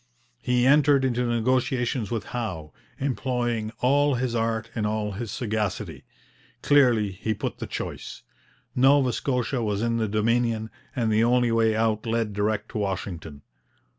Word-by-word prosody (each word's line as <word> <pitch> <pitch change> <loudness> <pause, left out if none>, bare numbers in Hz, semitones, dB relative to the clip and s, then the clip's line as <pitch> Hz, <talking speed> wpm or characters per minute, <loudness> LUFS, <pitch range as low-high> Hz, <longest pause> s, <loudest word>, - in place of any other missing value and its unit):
He 125 -1 +2
entered 140 -1 +5
into 125 -1 0
negotiations 125 0 0
with 115 -3 -2
Howe, 90 - -4 0.3
employing 120 -4 -1
all 140 +2 +3
his 125 0 -1
art 115 0 -1
and 105 -2 -1
all 105 -1 -2
his 110 +3 -5
sagacity. 110 -3 -3 0.6
Clearly 120 -8 +4
he 110 +3 -3
put - - -4
the - - -5
choice. - - -6 0.5
Nova 135 -1 +4
Scotia 125 -1 -1
was 105 -1 -1
in 115 0 +1
the 110 -1 0
Dominion, 110 +1 0 0.2
and 115 -4 0
the 110 +1 +3
only 120 0 +3
way 115 -1 +3
out 110 0 0
led 115 -2 0
direct 105 +1 -1
to - - -4
Washington. 85 -7 -4
115 Hz, 145 wpm, -25 LUFS, 110-125 Hz, 0.6 s, entered